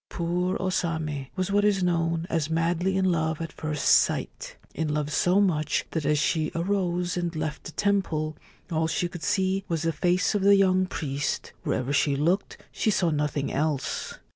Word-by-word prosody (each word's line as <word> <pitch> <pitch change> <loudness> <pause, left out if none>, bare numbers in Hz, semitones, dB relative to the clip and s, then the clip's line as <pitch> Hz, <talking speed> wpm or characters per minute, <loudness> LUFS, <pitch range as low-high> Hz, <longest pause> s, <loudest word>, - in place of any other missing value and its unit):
Poor 180 +2 -1
O 185 0 -1
Same 155 -6 -2
was 185 0 -1
what 205 +1 +3
is 200 -3 +2
known 165 -1 0
as 160 -3 -1
madly 170 +3 +1
in 190 - +2
love 160 -3 +1
at 165 -1 -5
first 155 -2 -3
sight, - - +2
— - - -31
in 160 -2 -2
love 150 0 -1
so 180 +5 +3
much 155 -7 +1
that 160 -3 -2
as 150 0 +3
she 155 +1 +1
arose 180 0 0
and 175 -1 -2
left 155 -1 -4
the - - -6
temple 165 -7 0 0.4
all 160 0 +1
she 175 - 0
could 175 -1 -9
see 190 +3 0
was 165 -2 -1
the 165 0 0
face 180 +5 +1
of 205 - 0
the 200 +1 +6
young 185 -1 +3
priest; 145 -4 -3
wherever 130 +3 -1
she 140 0 +2
looked 170 +8 0
she - - 0
saw 180 -5 +2
nothing 150 -1 -1
else. 145 -1 -2
165 Hz, 190 wpm, -26 LUFS, 155-185 Hz, 0.4 s, the